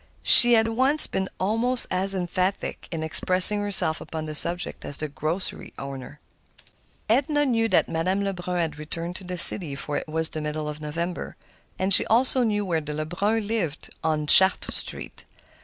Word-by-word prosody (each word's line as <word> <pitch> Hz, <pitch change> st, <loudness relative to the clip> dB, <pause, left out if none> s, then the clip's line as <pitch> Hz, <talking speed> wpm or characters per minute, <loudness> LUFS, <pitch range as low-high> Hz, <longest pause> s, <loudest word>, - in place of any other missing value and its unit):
She 240 Hz, 0 st, +10 dB
had 225 Hz, -1 st, +2 dB
once 265 Hz, +6 st, +1 dB
been 190 Hz, 0 st, -6 dB
almost 230 Hz, +6 st, -1 dB
as 190 Hz, +1 st, -1 dB
emphatic 185 Hz, +1 st, -5 dB
in 160 Hz, -2 st, -7 dB
expressing 185 Hz, +5 st, +6 dB
herself 190 Hz, -6 st, +2 dB
upon 160 Hz, -1 st, -9 dB
the 155 Hz, -, -8 dB
subject 170 Hz, +3 st, -2 dB
as 140 Hz, -, -2 dB
the 155 Hz, -, -5 dB
corner 155 Hz, +4 st, -6 dB, 0.4 s
grocer. 135 Hz, +1 st, -11 dB, 0.9 s
Edna 285 Hz, +6 st, -1 dB
knew 225 Hz, -4 st, -2 dB
that -, -, -1 dB
Madame 185 Hz, +5 st, -4 dB
Lebrun 180 Hz, -2 st, -6 dB
had 160 Hz, -3 st, -5 dB
returned 165 Hz, +3 st, -8 dB
to -, -, -14 dB
the 180 Hz, 0 st, -8 dB
city, 170 Hz, -4 st, +3 dB
for 145 Hz, +2 st, -6 dB
it -, -, -8 dB
was 160 Hz, +1 st, -3 dB
the 155 Hz, -, -8 dB
middle 150 Hz, 0 st, -7 dB
of 150 Hz, 0 st, -9 dB
November. 170 Hz, +4 st, -7 dB, 0.4 s
And 190 Hz, +1 st, +1 dB
she -, -, +5 dB
also 255 Hz, +3 st, 0 dB
knew 210 Hz, -3 st, -3 dB
where 165 Hz, -4 st, -3 dB
the 150 Hz, 0 st, -9 dB
Lebruns 200 Hz, +8 st, -4 dB
lived, 195 Hz, -9 st, -6 dB
on 155 Hz, -1 st, -3 dB
Chartres 190 Hz, +5 st, +3 dB
Street. -, -, -5 dB
180 Hz, 175 wpm, -22 LUFS, 155-210 Hz, 0.9 s, She